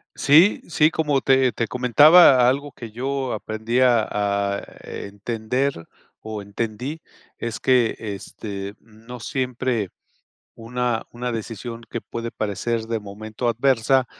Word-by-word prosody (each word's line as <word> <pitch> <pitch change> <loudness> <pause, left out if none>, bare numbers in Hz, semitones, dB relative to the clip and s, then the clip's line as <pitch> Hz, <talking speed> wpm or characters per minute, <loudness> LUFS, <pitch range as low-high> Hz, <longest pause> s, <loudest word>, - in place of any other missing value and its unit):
Sí 160 +8 +5
sí, 160 -1 +3
como 150 -5 +1
te 130 -2 +3
te 115 - -2
comentaba 125 +2 +6
algo 140 +1 -2
que 115 -3 -9
yo 130 +2 -2
aprendí 110 +3 -2
a 125 -3 +5
a 100 -1 0 0.2
entender, 110 +6 -3 0.5
o 110 -1 -6
entendí, 115 +9 -4 0.4
es 115 -1 -4
que, 125 -3 +3
este, 100 -1 -6
no 115 +2 -12
siempre, 125 -5 -2 0.7
una 120 0 -2
una 120 0 -4
decisión 115 +1 -6
que 115 - -5
puede 115 0 -5
parecer 110 +2 -2
de 115 0 -3
momento 110 +4 -5
adversa, 130 +1 +2
115 Hz, 125 wpm, -23 LUFS, 110-130 Hz, 0.7 s, comentaba